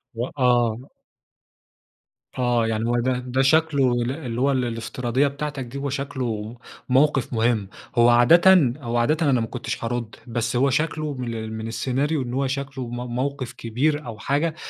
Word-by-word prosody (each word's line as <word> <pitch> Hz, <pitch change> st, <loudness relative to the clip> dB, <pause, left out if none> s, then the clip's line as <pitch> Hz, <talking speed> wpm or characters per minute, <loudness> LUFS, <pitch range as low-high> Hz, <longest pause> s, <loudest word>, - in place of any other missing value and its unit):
و 115 Hz, +2 st, -1 dB
آه. 120 Hz, -4 st, +2 dB, 1.6 s
آه، 120 Hz, -2 st, +2 dB
يعني 110 Hz, 0 st, -1 dB
هو 120 Hz, 0 st, +2 dB
ده 125 Hz, +1 st, 0 dB
ده 125 Hz, +1 st, -1 dB
شكله 140 Hz, -2 st, +3 dB
ال 120 Hz, 0 st, 0 dB
اللي 125 Hz, -5 st, -4 dB
هو 140 Hz, +1 st, +3 dB
ال 130 Hz, -2 st, +1 dB
الافتراضية 120 Hz, +3 st, -1 dB
بتاعتك 140 Hz, 0 st, -4 dB
دي 120 Hz, +3 st, -8 dB
هو 140 Hz, 0 st, -3 dB
شكله 125 Hz, -5 st, -4 dB, 0.3 s
موقِف 135 Hz, -1 st, +2 dB
مهم، 115 Hz, -3 st, +1 dB, 0.3 s
هو 120 Hz, 0 st, +6 dB
عادةً 150 Hz, +4 st, +6 dB
هو 120 Hz, -1 st, -2 dB
عادةً 150 Hz, +6 st, +2 dB
أنا 130 Hz, -3 st, +3 dB
ما 115 Hz, -, -2 dB
كنتش 125 Hz, 0 st, -5 dB
هارد، 115 Hz, -1 st, -3 dB
بس 120 Hz, 0 st, -2 dB
هو 135 Hz, +3 st, +3 dB
شكله 155 Hz, +1 st, -1 dB
من 125 Hz, -3 st, -4 dB
ال 110 Hz, -1 st, -5 dB
من 110 Hz, 0 st, -5 dB
السيناريو 135 Hz, +6 st, -1 dB
إن 125 Hz, -1 st, -5 dB
هو 135 Hz, +1 st, 0 dB
شكله 135 Hz, -1 st, -4 dB
م 120 Hz, -, -6 dB, 0.2 s
موقِف 130 Hz, -1 st, -3 dB
كبير 140 Hz, +7 st, -1 dB
أو 115 Hz, -3 st, -7 dB
حاجة 150 Hz, +7 st, 0 dB
125 Hz, 170 wpm, -23 LUFS, 120-140 Hz, 1.6 s, هو